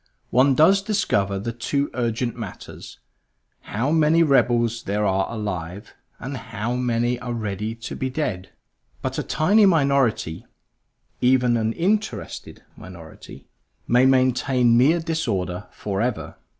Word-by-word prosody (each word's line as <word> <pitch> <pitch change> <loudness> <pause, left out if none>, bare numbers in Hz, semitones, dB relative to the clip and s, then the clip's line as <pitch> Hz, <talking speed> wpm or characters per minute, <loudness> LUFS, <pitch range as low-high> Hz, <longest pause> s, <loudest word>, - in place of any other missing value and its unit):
One 130 +2 +4
does 190 +7 +5
discover 105 - 0
the 105 +4 -4
two 140 +5 -2
urgent 120 0 -2
matters; - - -9 0.6
how 120 +8 -2
many 160 +1 +4
rebels 120 -5 +2
there 105 0 -1
are 95 -1 0
alive, 100 -3 -5 0.2
and 135 +2 -6
how 115 -1 -4
many 120 -1 0
are 120 -1 -5
ready 110 0 -4
to 115 - -7
be 130 - -3
dead. 110 -10 -3 0.5
But - - -3
a - - 0
tiny 205 +6 +3
minority, 140 - +1 0.7
even 125 -1 +3
an 110 -1 0
interested 210 - -3
minority, 85 -4 -12 0.4
may 125 +2 +4
maintain 130 -2 +3
mere 145 +8 +4
disorder 95 - -3
forever. 105 +5 -3
120 Hz, 125 wpm, -23 LUFS, 105-140 Hz, 0.7 s, does